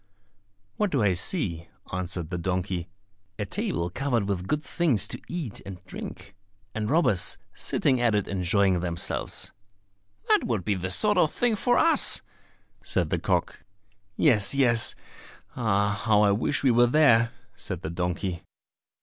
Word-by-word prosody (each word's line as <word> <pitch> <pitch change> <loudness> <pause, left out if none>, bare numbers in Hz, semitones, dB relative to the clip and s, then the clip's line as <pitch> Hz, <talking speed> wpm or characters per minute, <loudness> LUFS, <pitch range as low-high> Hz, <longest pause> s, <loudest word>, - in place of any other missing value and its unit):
"What 210 - +1
do 135 -9 0
I 100 -2 +3
see?" 85 - 0 0.3
answered 90 -2 -3
the 90 - -3
donkey; 90 0 -3 0.5
"a 105 - -3
table 85 -2 -2
covered 125 0 -1
with 95 -2 -3
good 150 +6 -1
things 150 - +1
to - - -4
eat 160 - -5
and 95 -2 -10
drink, 100 - -9 0.4
and 105 -1 -3
robbers 140 - +3 0.2
sitting 130 -2 0
at 115 -3 +2
it 105 - 0
enjoying 95 0 +1
themselves." 85 -1 -2 0.8
"That - - +3
would 110 -7 -2
be 105 - +1
the 95 -1 -4
sort 210 - +4
of 155 - +3
thing 240 -2 +1
for 245 +4 +1
us," - - +3 0.6
said - - -1
the - - 0
cock. - - -1 0.5
"Yes, 110 -5 +4
yes; 120 -4 +3 0.6
ah, 105 -3 0
how 105 -2 +4
I 100 - +4
wish 115 +8 0
we 135 - +4
were 120 +1 +4
there!" 120 -4 +4 0.2
said - - -4
the 80 - -4
donkey. 90 +1 -3
105 Hz, 150 wpm, -26 LUFS, 90-130 Hz, 0.8 s, sort